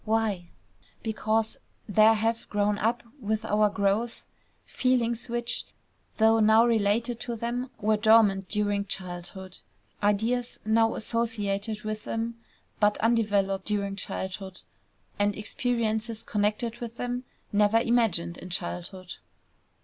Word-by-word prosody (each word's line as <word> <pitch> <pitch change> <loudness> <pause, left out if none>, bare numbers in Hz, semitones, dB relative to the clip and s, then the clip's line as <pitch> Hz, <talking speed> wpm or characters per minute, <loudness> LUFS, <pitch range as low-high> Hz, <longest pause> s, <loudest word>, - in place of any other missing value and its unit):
Why? 215 -5 0 0.5
Because 220 0 0 0.3
there 215 +1 +6
have 225 +1 -1
grown 205 0 +1
up 230 +2 0 0.2
with 220 -2 -2
our 210 0 +3
growth 205 +3 -1 0.4
feelings 240 -2 0
which, 240 0 -1 0.5
though 225 0 +5
now 220 +1 +6
related 230 +1 +1
to 240 -1 -4
them, 240 +3 -3
were 215 +1 +2
dormant 210 -3 +4
during 205 -1 0
childhood; 185 0 -6 0.4
ideas 225 +4 0
now 225 +1 +3
associated 215 -2 -2
with 215 0 -4
them, 230 +1 -3 0.4
but 210 -1 +3
undeveloped 205 -4 +1
during 200 -2 -1
childhood; 190 -1 -5 0.6
and 205 0 +2
experiences 225 0 -2
connected 215 +3 -1
with 235 -1 -7
them, 245 0 -3 0.3
never 210 +2 +4
imagined 220 -8 +1
in 185 - -9
childhood. 180 +1 -4
215 Hz, 115 wpm, -27 LUFS, 200-230 Hz, 0.6 s, there